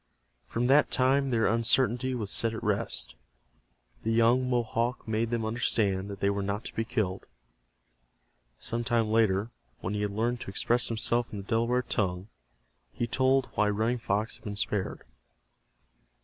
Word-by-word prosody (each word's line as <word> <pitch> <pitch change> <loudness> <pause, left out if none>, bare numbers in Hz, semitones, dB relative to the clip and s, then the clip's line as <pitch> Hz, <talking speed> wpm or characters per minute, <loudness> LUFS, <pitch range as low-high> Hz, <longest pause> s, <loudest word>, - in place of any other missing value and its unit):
From 115 - -2
that 140 +4 +5
time 135 +2 +2
their 115 -3 +2
uncertainty 125 +2 +3
was 105 -5 -4
set 115 -1 +1
at - - -6
rest. 105 - -1 0.9
The 115 - -1
young 120 +3 +3
Mohawk 120 0 -1
made 110 +1 0
them 115 -1 -1
understand 105 -4 0
that 100 -1 -8
they 100 - +3
were 100 0 -2
not 100 +2 -3
to - - -6
be 115 - 0
killed. 95 -4 -2 1.3
Some 115 - -3
time 115 -2 +1
later, 110 -1 +2 0.3
when 95 - -3
he 105 - -2
had 105 - 0
learned 115 +4 -1
to - - -6
express 120 +5 +1
himself 120 +1 0
in 105 - -6
the 100 - -6
Delaware 115 +2 +1
tongue, 95 -4 -2 0.6
he 120 - -2
told 130 +2 +2
why 105 - +2
Running 110 +4 0
Fox 105 0 -1
had - - -26
been 105 -1 -5
spared. 100 -1 -2
115 Hz, 165 wpm, -29 LUFS, 105-120 Hz, 1.3 s, that